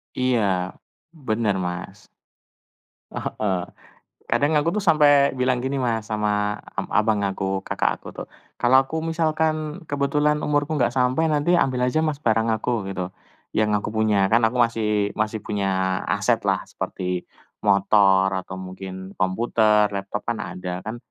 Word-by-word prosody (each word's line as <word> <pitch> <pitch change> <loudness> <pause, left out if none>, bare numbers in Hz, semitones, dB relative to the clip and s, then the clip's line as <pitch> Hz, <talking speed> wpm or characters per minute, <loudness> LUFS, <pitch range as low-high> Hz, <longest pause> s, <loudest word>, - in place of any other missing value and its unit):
Iya, 100 -8 0 0.3
bener 115 - -1
Mas. 90 0 -6 1.1
Heeh 95 -4 -2 0.6
kadang 150 +2 +1
aku 150 +3 +2
tuh - - -7
sampai 145 -3 +5
bilang 125 -1 +1
gini 135 +2 -2
Mas, 115 -5 -1
sama 105 -1 0 0.2
ab - - -2
abang 110 -1 +2
aku, 95 0 -2
kakak - - -1
aku - - -11
tuh, - - -6 0.3
kalau 130 +2 +5
aku 160 +4 -4
misalkan 160 0 -1
kebetulan 150 +1 +1
umurku 145 +1 0
enggak 120 +1 +1
sampai, 130 +6 +2
nanti 150 +2 +1
ambil 130 -7 +2
aja 125 +5 +1
Mas, 155 -2 0
barang 115 0 +2
aku, 110 -3 -2
gitu, 95 -1 -4 0.4
yang 110 0 +1
aku 105 - -3
punya. 110 -1 +2 0.2
Kan 115 - +5
aku 125 - -6
masih 105 -3 0
masih 110 0 -1
punya 100 -2 -2 0.4
aset - - +1
lah, - - +1
seperti 90 -1 -4 0.3
motor 100 -1 +4
atau 95 0 -4
mungkin 95 +1 -8
komputer, 105 +2 +2
laptop 100 +1 -4
kan 120 -1 -1
ada, 90 -3 -5
kan. 110 +2 -5
110 Hz, 145 wpm, -23 LUFS, 100-140 Hz, 1.1 s, sampai